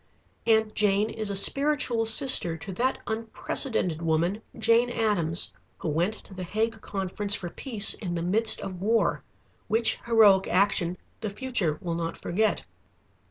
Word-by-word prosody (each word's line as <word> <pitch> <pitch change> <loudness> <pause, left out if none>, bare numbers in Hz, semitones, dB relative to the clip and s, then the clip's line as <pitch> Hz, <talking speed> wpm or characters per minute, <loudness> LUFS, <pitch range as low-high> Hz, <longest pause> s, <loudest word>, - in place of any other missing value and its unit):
Aunt 220 -1 +3
Jane 210 +1 +1
is 220 -1 -3
a 200 - -2
spiritual 275 +1 +2
sister 225 -8 +4
to 195 +4 -8
that 255 +7 0
unprecedented 220 - -2
woman, 170 +5 0 0.2
Jane 230 +2 +3
Addams, 200 -8 0 0.2
who 165 - -4
went 175 +8 0
to - - -14
the 185 - -8
Hague 220 +4 -2
conference 200 +1 -2
for 175 -2 -6
Peace 220 -6 +2
in 180 -5 -5
the 170 - -3
midst 215 +5 +3
of 185 -2 -7
war, 225 +3 +1 0.5
which 225 +1 +1
heroic 210 -5 +5
action 180 -2 +1 0.2
the 215 - -4
future 205 - -1
will 170 -2 -2
not 165 0 -4
forget. 215 +5 -1
205 Hz, 150 wpm, -26 LUFS, 180-225 Hz, 0.5 s, heroic